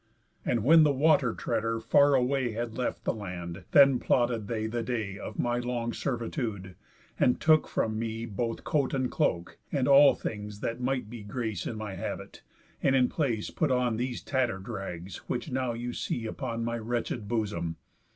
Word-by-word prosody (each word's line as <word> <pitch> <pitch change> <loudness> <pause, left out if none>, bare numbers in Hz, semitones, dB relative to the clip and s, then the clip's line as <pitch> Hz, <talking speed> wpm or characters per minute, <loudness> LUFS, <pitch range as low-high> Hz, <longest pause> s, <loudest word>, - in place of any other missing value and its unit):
And 120 -4 0
when 160 +6 +7
the 150 -2 +5
water 140 -3 +3
treader 115 0 -1
far 140 +5 +4
away 130 -2 +1
Had 115 0 -4
left 125 - -2
the - - 0
land, 90 -4 -6
then 140 -3 +6
plotted 120 -4 +1
they 110 -1 -2
the 115 +2 -2
day 110 -5 -3
Of - - -7
my 120 0 0
long 120 -1 -2
servitude, 115 - -3 0.5
and 125 - +3
took 155 -1 +4
from 110 -1 -1
me 115 0 -3
Both 115 +1 -3
coat 140 -3 0
and 130 -2 0
cloak, 90 - -1
and 135 -4 +1
all 140 0 +7
things 105 -1 -6
that 115 +2 -3
might 125 -2 -1
be 115 0 -8
Grace 110 +1 -3
in 115 - -4
my 110 -2 -5
habit, - - -6 0.4
and 135 - +3
in 125 -1 +4
place 120 -9 -1
put 155 - 0
on 125 -3 +1
These 125 +1 -3
tatter'd 120 -8 -1
rags, 95 -5 -6
which 125 +4 -3
now 130 -2 -1
you 120 +1 -4
see 115 -1 -3
upon 115 -1 -3
My 115 0 -2
wretched 115 -1 -3
bosom. 100 -8 -2
120 Hz, 180 wpm, -29 LUFS, 110-130 Hz, 0.5 s, when